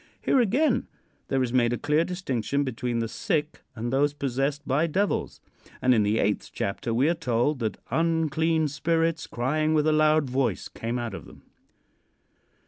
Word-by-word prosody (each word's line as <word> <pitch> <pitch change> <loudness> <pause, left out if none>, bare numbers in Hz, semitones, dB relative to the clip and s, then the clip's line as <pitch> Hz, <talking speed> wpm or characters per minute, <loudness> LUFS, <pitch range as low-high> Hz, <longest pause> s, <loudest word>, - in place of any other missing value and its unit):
Here 270 - +2
again 250 +3 +2 0.4
there 135 -1 +1
is 120 -1 -3
made 120 -2 +3
a - - -1
clear 150 +6 +2
distinction 145 - -2
between 125 -2 -2
the 115 0 -1
sick 155 - -2
and 120 +2 -3
those 145 +2 +2
possessed 140 +2 -2
by 145 +5 +2
devils. 195 +6 -1 0.4
And 125 - +4
in 110 - +3
the 105 +1 +1
eighth 105 -1 0
chapter 100 +4 -3
we 125 +6 +2
are 170 - +3
told 145 -3 0
that 110 -3 -2
"unclean 160 -1 +1
spirits, 165 +2 0
crying 155 +6 0
with 150 -1 +2
a 155 - +3
loud 155 -1 +3
voice, 130 0 -1
came 115 +2 -4
out 120 -3 -4
of - - -8
them." - - -16
145 Hz, 170 wpm, -26 LUFS, 120-160 Hz, 0.4 s, And